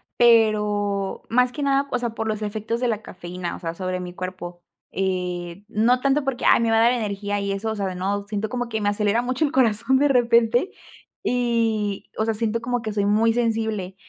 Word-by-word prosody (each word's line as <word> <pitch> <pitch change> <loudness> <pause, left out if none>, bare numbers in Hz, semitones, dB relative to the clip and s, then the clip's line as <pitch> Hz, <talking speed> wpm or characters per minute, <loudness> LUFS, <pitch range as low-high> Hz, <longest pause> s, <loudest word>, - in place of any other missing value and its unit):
pero 210 -4 +2
más 250 +2 +3
que 290 - -6
nada, 275 0 +2
o 250 - 0
sea, 240 -2 -2
por 225 0 -4
los 215 -1 -2
efectos 215 +2 -3
de 250 - 0
la 220 -2 -1
cafeína, 175 -2 -6
o - - -10
sea, 165 -2 -4
sobre 185 0 -3
mi 180 -1 -7
cuerpo. 180 -1 -7 0.3
Eh, 180 -1 -3
no 230 +3 +2
tanto, 275 +2 +1
porque: 270 -3 -3
"Ay, - - +6
me 225 -1 +1
va 225 - +4
a - - +5
dar 240 +2 +5
energía 205 -3 -2
y 200 0 -2
eso", 195 +3 -2
o - - -3
sea, 195 -3 -2
no 200 +2 -2
siento 210 0 -3
como 245 0 -3
que 220 - -2
me 205 - +2
acelera 210 +2 +1
mucho 255 +5 0
el 280 - -2
corazón 235 0 +2
de 290 - +4
repente, 240 - +3 0.5
y 230 -4 0
o 220 - +1
sea, 225 - 0
siento 225 +1 -1
como 245 0 -1
que 215 -2 -4
soy 205 -1 0
muy 220 +2 +3
sensible. 220 -5 -1
220 Hz, 215 wpm, -23 LUFS, 200-240 Hz, 0.5 s, Ay